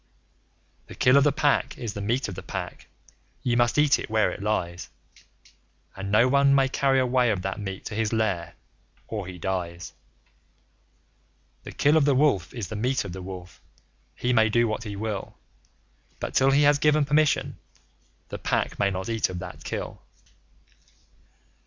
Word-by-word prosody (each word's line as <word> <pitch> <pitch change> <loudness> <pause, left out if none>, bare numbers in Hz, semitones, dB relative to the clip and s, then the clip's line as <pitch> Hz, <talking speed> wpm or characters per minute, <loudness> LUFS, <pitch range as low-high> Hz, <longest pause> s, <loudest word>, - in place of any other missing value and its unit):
The - - -11
Kill 125 - +4
of 140 - +6
the 145 - +4
Pack 145 +1 +1
is 115 -5 -5
the 100 - -6
meat 120 +7 0
of 100 - -6
the 95 - -7
Pack. - - -7 0.6
Ye 120 -2 +1
must 120 +2 +2
eat 150 -1 +4
where 110 0 +2
it - - -8
lies; 90 -4 -2 1.1
And 100 0 -5
no 110 +4 +5
one 140 +1 +4
may 135 -1 +3
carry 135 0 +2
away 125 -1 +2
of 100 -4 -1
that 95 +1 -3
meat 95 -2 -6
to - - -5
his 110 0 -1
lair, 95 -7 -1 0.5
or 105 -5 -5
he 90 -1 -8
dies. 85 -2 -4 1.7
The - - -7
Kill 150 +2 +3
of 150 - +3
the 140 -2 +3
Wolf 130 - +2
is 115 -7 -5
the - - -5
meat 125 +2 0
of 95 - -6
the 95 - -7
Wolf. 90 -1 -9 0.5
He 125 +1 0
may 110 -2 +4
do 120 +2 +2
what 110 +1 -3
he 105 -1 -5
will, 105 -1 -5 0.8
But, - - -5
till 135 0 +4
he 140 +2 +4
has 145 0 +4
given 150 0 +3
permission, 150 +1 +1 0.7
the - - -6
Pack - - -1
may 100 - +3
not 95 -1 -4
eat 115 -2 0
of 90 - -5
that 90 - -8
Kill. - - -5
110 Hz, 175 wpm, -25 LUFS, 95-135 Hz, 1.7 s, of